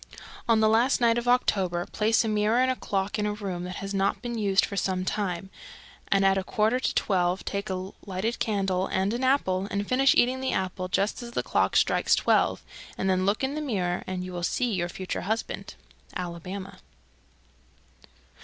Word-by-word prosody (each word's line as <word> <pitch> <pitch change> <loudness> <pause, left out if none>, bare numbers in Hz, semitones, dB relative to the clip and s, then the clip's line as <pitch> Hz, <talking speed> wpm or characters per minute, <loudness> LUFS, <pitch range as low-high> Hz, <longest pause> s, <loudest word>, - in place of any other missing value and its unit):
_ - - -11
314. - - -15
On 225 -1 +5
the 215 - +5
last 235 +4 +3
night 235 -1 +3
of 240 - -6
October 190 -8 +2
place 220 +2 +2
a - - -1
mirror 215 +1 +2
and 260 +1 +3
a - - -1
clock 195 -2 -2
in 210 - +1
a 210 - -1
room 190 -4 -4
that 180 0 -6
has 195 0 -5
not 195 0 +1
been 240 -1 -4
used 200 -3 +2
for 200 - -7
some 185 -1 -1
time, 190 -2 -2 0.6
and 195 0 +4
at 195 0 +4
a - - -4
quarter 220 +5 +1
to - - -1
twelve 180 -1 +1
take 200 +1 -3
a 185 +1 -4 0.2
lighted 200 +5 -2
candle 195 -3 0
and 195 +3 0
an 245 +2 -2
apple, 200 -8 +2
and 200 0 -2
finish 270 +2 +4
eating 255 +2 +3
the 265 - -1
apple 185 -1 -2
just 200 +6 0
as 235 0 -8
the - - -1
clock - - +1
strikes - - +3
twelve, - - +2 0.3
and 190 - +1
then 185 0 +1
look 205 +5 +1
in 265 +1 0
the 305 - -3
mirror 185 -11 -1
and 185 -1 -3
you 185 0 -7
will 175 - -4
see 240 +6 0
your 175 -2 -1
future 185 +1 -4
husband. 220 +4 -3 0.4
_Alabama. 180 +2 -6
200 Hz, 205 wpm, -27 LUFS, 185-230 Hz, 0.6 s, On